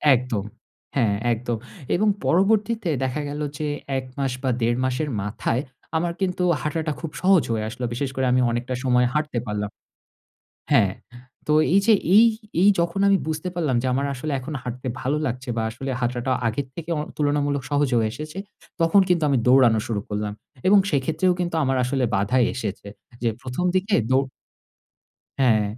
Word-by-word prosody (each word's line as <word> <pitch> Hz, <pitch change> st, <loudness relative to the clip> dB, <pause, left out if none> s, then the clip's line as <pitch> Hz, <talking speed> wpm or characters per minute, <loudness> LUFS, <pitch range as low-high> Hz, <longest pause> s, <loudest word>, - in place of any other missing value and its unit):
একদম। 120 Hz, -5 st, -2 dB, 0.5 s
হ্যাঁ 115 Hz, -7 st, +2 dB, 0.2 s
একদম। 120 Hz, 0 st, -3 dB, 0.4 s
এবং 210 Hz, +5 st, +2 dB, 0.2 s
পরবর্তীতে 210 Hz, +2 st, +2 dB
দেখা 130 Hz, +3 st, -1 dB
গেল 150 Hz, +1 st, -4 dB, 0.2 s
যে, 150 Hz, -, -2 dB, 0.3 s
১ 130 Hz, -, -4 dB
মাস 135 Hz, -2 st, 0 dB
বা 130 Hz, -, +1 dB
১.৫ 120 Hz, +1 st, +2 dB
মাসের 145 Hz, +4 st, -1 dB
মাথায় 110 Hz, +4 st, -1 dB, 0.4 s
আমার 170 Hz, +1 st, -1 dB
কিন্তু 180 Hz, -1 st, 0 dB, 0.2 s
হাঁটাটা 155 Hz, +1 st, -2 dB
খুব 160 Hz, -2 st, -5 dB
সহজ 185 Hz, -3 st, +5 dB
হয়ে 110 Hz, -1 st, -1 dB
আসলো। 125 Hz, +1 st, -5 dB
বিশেষ 135 Hz, +2 st, -2 dB
করে 130 Hz, -, 0 dB
আমি 125 Hz, 0 st, +3 dB
অনেকটা 120 Hz, +2 st, -2 dB
সময় 125 Hz, -1 st, +3 dB
হাঁটতে 150 Hz, -5 st, -1 dB
পারলাম 105 Hz, 0 st, -2 dB, 1.0 s
হ্যাঁ। 95 Hz, -2 st, +4 dB, 0.5 s
তো 150 Hz, -, +1 dB, 0.2 s
এই 200 Hz, -, +6 dB
যে 225 Hz, -, +6 dB, 0.2 s
এই, 225 Hz, -, +9 dB, 0.4 s
এই 200 Hz, -, +7 dB
যখন 170 Hz, +3 st, -1 dB
আমি 195 Hz, -1 st, +4 dB
বুঝতে 160 Hz, +3 st, -2 dB
পারলাম, 155 Hz, -8 st, 0 dB
যে 130 Hz, -, -1 dB
আমার 140 Hz, +2 st, 0 dB
আসলে 145 Hz, +4 st, -4 dB
এখন 150 Hz, +4 st, -6 dB
হাঁটতে 125 Hz, +1 st, -6 dB
ভালো 140 Hz, +4 st, 0 dB
লাগছে 125 Hz, +1 st, -4 dB
বা 115 Hz, -, 0 dB
আসলে 135 Hz, +4 st, -5 dB
হাঁটাটা 125 Hz, +1 st, -1 dB
আগের 125 Hz, +5 st, -1 dB
থেকে 170 Hz, 0 st, -6 dB
অ -, -, -1 dB, 0.2 s
তুলনামূলক 145 Hz, -2 st, 0 dB
সহজ 145 Hz, -1 st, +2 dB
হয়ে 110 Hz, -2 st, +2 dB
এসেছে, 155 Hz, +5 st, -7 dB, 0.4 s
তখন 165 Hz, +5 st, +5 dB
কিন্তু 175 Hz, -3 st, +2 dB
আমি 135 Hz, -, +3 dB
দৌড়ানো 125 Hz, -3 st, +6 dB
শুরু 110 Hz, -3 st, -1 dB
করলাম 105 Hz, 0 st, -2 dB, 0.3 s
এবং 200 Hz, +1 st, +7 dB
সেক্ষেত্রেও 160 Hz, +6 st, +1 dB
কিন্তু 175 Hz, -2 st, -2 dB
আমার 135 Hz, 0 st, +1 dB
আসলে 130 Hz, 0 st, 0 dB
বাধা 100 Hz, +6 st, +1 dB, 0.2 s
এসেছে। 105 Hz, -4 st, -5 dB, 0.3 s
যে 115 Hz, -, +2 dB
১ম 130 Hz, +7 st, -3 dB
দিকে 195 Hz, +3 st, +1 dB, 0.2 s
দো 130 Hz, -, +5 dB, 1.2 s
হ্যাঁ, 115 Hz, -5 st, +4 dB
135 Hz, 170 wpm, -23 LUFS, 120-160 Hz, 1.2 s, এই